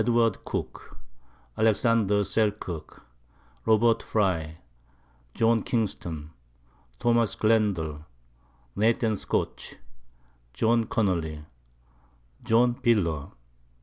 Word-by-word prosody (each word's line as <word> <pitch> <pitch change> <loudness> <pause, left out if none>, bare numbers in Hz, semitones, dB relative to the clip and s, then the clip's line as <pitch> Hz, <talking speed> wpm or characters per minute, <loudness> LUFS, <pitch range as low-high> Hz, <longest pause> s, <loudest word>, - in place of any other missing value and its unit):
Cooke, - - -6 0.6
Alex. 110 -2 +3
Selkirk, 105 -5 0 0.6
Rob. 115 +1 +4
Frye, 85 -7 -1 0.8
John 115 0 +3
Kingston, 85 -9 -3 0.7
Tho. 120 - +2 0.2
Glendall, 100 -9 +1 0.7
Nath. 110 0 +1
Scotch, - - -3 0.8
John 115 - +2
Connely, 85 -9 -1 1.0
John 120 +1 +3
Piller. 85 -11 +1
105 Hz, 65 wpm, -26 LUFS, 85-115 Hz, 1.0 s, Rob